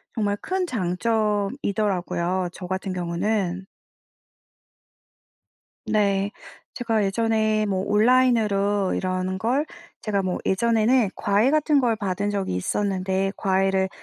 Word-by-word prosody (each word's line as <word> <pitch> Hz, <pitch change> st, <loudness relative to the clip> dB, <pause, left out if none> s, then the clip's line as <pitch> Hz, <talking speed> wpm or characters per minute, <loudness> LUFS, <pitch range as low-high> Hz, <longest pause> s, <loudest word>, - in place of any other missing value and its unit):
정말 205 Hz, -3 st, 0 dB
큰 375 Hz, 0 st, -1 dB
장점이더라고요 200 Hz, -, -1 dB
저 180 Hz, -, -9 dB
같은 190 Hz, +1 st, -3 dB
경우는. 185 Hz, +1 st, -2 dB, 2.2 s
네. 200 Hz, -1 st, +1 dB, 0.4 s
제가 225 Hz, -4 st, 0 dB
예전에 215 Hz, +1 st, +1 dB
뭐 190 Hz, -2 st, -1 dB
온라인으로 210 Hz, -4 st, +2 dB
이런 185 Hz, 0 st, -2 dB
걸 250 Hz, +9 st, 0 dB, 0.4 s
제가 205 Hz, -2 st, 0 dB
뭐 185 Hz, -1 st, -2 dB
예전에는 230 Hz, +2 st, +2 dB
과외 205 Hz, +5 st, +2 dB
같은 305 Hz, -1 st, +3 dB
걸 235 Hz, -4 st, +2 dB
받은 200 Hz, -1 st, -2 dB
적이 195 Hz, -, -2 dB
있었는데 190 Hz, -, -1 dB
과외를 190 Hz, 0 st, +1 dB
200 Hz, 230 characters per minute, -24 LUFS, 190-225 Hz, 2.2 s, 같은